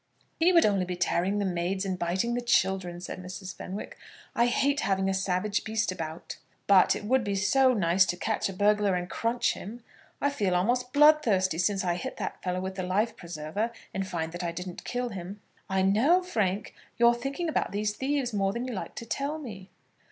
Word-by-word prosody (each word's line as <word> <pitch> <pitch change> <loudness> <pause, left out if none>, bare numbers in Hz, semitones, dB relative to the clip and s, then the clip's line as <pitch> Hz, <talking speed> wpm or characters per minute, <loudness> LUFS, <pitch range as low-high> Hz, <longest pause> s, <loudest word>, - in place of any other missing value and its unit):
"He 340 +3 +5
would 335 -2 +6
only 200 -3 +2
be 180 0 -4
tearing 180 +2 0
the 205 - 0
maids 185 +2 -1
and 185 -1 -2
biting 185 +8 0
the 245 - -1
children," 190 -6 +1
said 180 - -6
Mrs. 185 +1 -7
Fenwick. 195 +3 -7 0.4
"I 235 - +4
hate 280 +4 +1
having 190 -4 +1
a 195 - +1
savage 190 +2 0
beast 220 -2 -1
about." 160 -2 -6 0.3
"But 195 -2 +5
it - - -6
would 260 +3 +2
be 200 -1 -1
so 255 +7 +3
nice 180 -1 +4
to 175 - -2
catch 220 +1 -1
a - - -5
burglar 205 0 +2
and 180 0 -2
crunch 230 +5 0
him. 230 +5 -9 0.4
I 285 - +1
feel 200 -9 0
almost 245 +7 +1
bloodthirsty 250 - +4
since 195 +2 +1
I 175 -1 0
hit - - -5
that - - -5
fellow 180 0 -2
with 190 +1 -5
the 185 - -2
life 200 +6 0
preserver, 170 +6 -4 0.2
and 195 0 -2
find 165 -3 -3
that 175 +1 -6
I 170 - -1
didn't 180 +1 -7
kill 245 0 -2
him." 195 0 -7 0.3
"I 190 0 +1
know, 260 - +4
Frank, 210 - -1 0.2
you're 235 0 +6
thinking 275 +8 -3
about 315 - -1
these 205 +1 -1
thieves 265 0 -1
more 195 -1 +1
than 240 +1 -3
you 250 - -4
like 195 - -6
to 230 - -6
tell 280 +6 -2
me." 210 -10 -9
200 Hz, 205 wpm, -28 LUFS, 185-240 Hz, 0.4 s, would